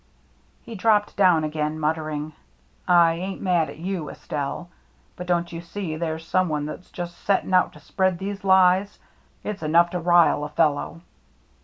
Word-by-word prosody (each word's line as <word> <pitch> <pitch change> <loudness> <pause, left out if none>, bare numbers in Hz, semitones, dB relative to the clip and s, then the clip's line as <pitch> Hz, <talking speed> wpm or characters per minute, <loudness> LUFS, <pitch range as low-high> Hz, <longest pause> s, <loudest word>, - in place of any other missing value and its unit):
He 235 - -9
dropped 210 0 +1
down 180 -5 +4
again, 155 0 -2
muttering: 155 -1 -2 0.3
" - - -38 0.2
I 170 -2 +5
ain't 185 +3 -5
mad 175 -5 +1
at - - -10
you, 170 -3 -4
Estelle, 145 +4 -5 0.4
but 180 - -8
don't 175 -1 0
you 165 - -5
see 170 -1 -5
there's 160 0 -4
some 185 0 +1
one 150 -1 -2
that's 165 +4 -8
just 175 -1 -7
setting 195 -1 0
out 185 - +4
to 150 - -14
spread 185 +4 0
these 200 +2 -5
lies. 190 +1 +4 0.5
It's 210 -2 -5
enough 170 +2 +3
to 180 - -2
rile 170 -3 +4
a 150 - -4
fellow. 150 +1 0
170 Hz, 170 wpm, -24 LUFS, 155-185 Hz, 0.5 s, I